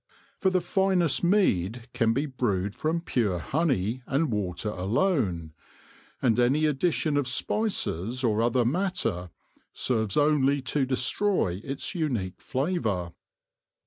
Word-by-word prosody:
For 190 - +3
the 185 -1 +1
finest 180 -3 +1
mead 120 - +1
can 115 -2 +2
be 135 +6 0
brewed 105 -8 -1
from 160 +6 -1
pure 110 - 0
honey 130 - 0
and 140 0 0
water 105 0 -2
alone, 95 - 0 0.7
and 120 -2 +3
any 135 +6 +3
addition 155 0 +1
of 145 -3 0
spices 130 - -1
or 110 -2 +2
other 120 +1 +2
matter 155 - -1 0.4
serves 110 -5 0
only 145 -2 +3
to 135 +2 0
destroy 130 - 0
its 135 +7 -4
unique 125 - -2
flavour. 115 - -1
130 Hz, 120 wpm, -27 LUFS, 105-155 Hz, 0.7 s, For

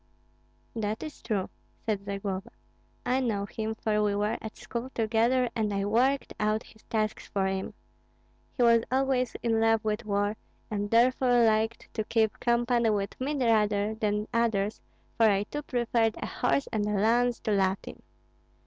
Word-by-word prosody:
"That 215 -1 -2
is 310 -1 -8
true," 200 -5 -2 0.3
said 205 -3 -1
Zagloba. 195 +1 -4 0.6
"I 255 +2 +2
know 215 -6 -1
him, 220 +1 -4
for 215 -1 0
we 205 -1 +1
were 210 +1 0
at 220 - -8
school 240 +2 -5
together 230 +3 +2
and 215 -2 0
I 195 0 -1
worked 255 +6 +1
out 215 +1 +1
his 220 - -18
tasks 215 -1 -2
for 195 -1 -1
him. 190 0 -2 0.8
He 250 - +3
was 230 -1 +6
always 260 -2 +1
in 225 -2 +2
love 225 -1 +3
with 215 +2 -1
war, 205 0 0 0.3
and 205 -1 -2
therefore 245 +1 +4
liked 220 +1 0
to 220 - -1
keep 220 0 +1
company 240 -1 +2
with 200 -2 -1
me 290 +3 -1
rather 215 -4 +2
than 210 -1 -1
others, 220 -3 0 0.4
for 225 -1 +6
I 200 0 +2
too 295 +8 -5
preferred 235 -4 0
a - - -4
horse 270 +2 0
and 210 -1 0
a 210 - 0
lance 235 +4 +2
to 215 - -1
Latin." 195 -1 0
220 Hz, 165 wpm, -28 LUFS, 205-235 Hz, 0.8 s, was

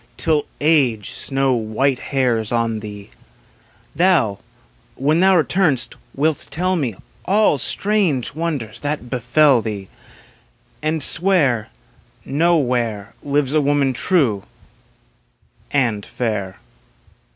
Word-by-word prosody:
Till 155 -3 +1
age 135 -9 +2
snow 135 -1 0
white 125 +3 0
hairs 125 -6 -1
on 115 -2 0
thee; 105 -2 -10 0.8
Thou, 165 - +2 0.6
when 150 +5 +1
thou 190 +1 +4
retum'st, 160 -6 +1 0.2
wilt 150 +1 0
tell 185 +4 -1
me 130 - -2 0.3
All 200 -7 +2
strange 190 - +1
wonders 140 -9 -4
that 145 -3 -4
befell 130 +1 +3
thee, 105 -4 -6 0.9
And 155 -1 0
swear 150 - +3 0.6
Nowhere 125 -9 0
Lives 145 -1 -1
a 155 - +3
woman 140 -2 +1
true 125 - +1 1.3
and 115 -7 0
fair. 100 -6 -4
135 Hz, 100 wpm, -19 LUFS, 115-155 Hz, 1.3 s, thou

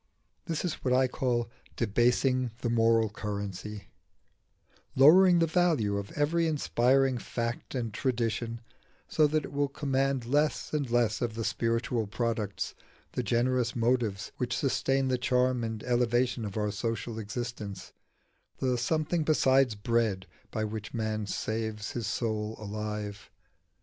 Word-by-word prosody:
This 165 +1 -2
is 170 - -4
what 125 -1 +2
I 130 0 +4
call 120 -2 -1 0.3
debasing 125 +3 +2
the 120 - 0
moral 115 -1 +4
currency: 100 -1 -5 1.1
lowering 175 +7 +7
the 165 - +4
value 160 - +2
of 100 -1 -5
every 165 +3 +1
inspiring 135 -3 +2
fact 115 +3 -4
and 115 -4 -2
tradition 115 -1 -1 0.5
so 155 - +3
that 155 0 0
it - - -9
will 145 0 +1
command 135 -2 0
less 145 +6 0
and 145 -4 -1
less 115 -3 +1
of 115 -3 -1
the 115 - -3
spiritual 115 0 0
products, 110 -2 -2 0.4
the - - -2
generous 120 +2 +1
motives 115 -4 0
which 125 -1 -1
sustain 135 0 +1
the 130 -1 +1
charm 125 0 +2
and 110 -1 -4
elevation 120 -1 +1
of 100 0 -5
our 105 -1 0
social 115 +1 -3
existence 105 -3 -6 0.6
the 125 -2 0
something 155 +5 0
besides 135 -5 +3
bread 105 -3 0 0.2
by 110 - -2
which 110 +1 -5
man 110 -2 -2
saves 110 +1 -3
his 115 -4 -3
soul 110 -1 -2
alive. 105 -1 -5
120 Hz, 135 wpm, -29 LUFS, 110-130 Hz, 1.1 s, lowering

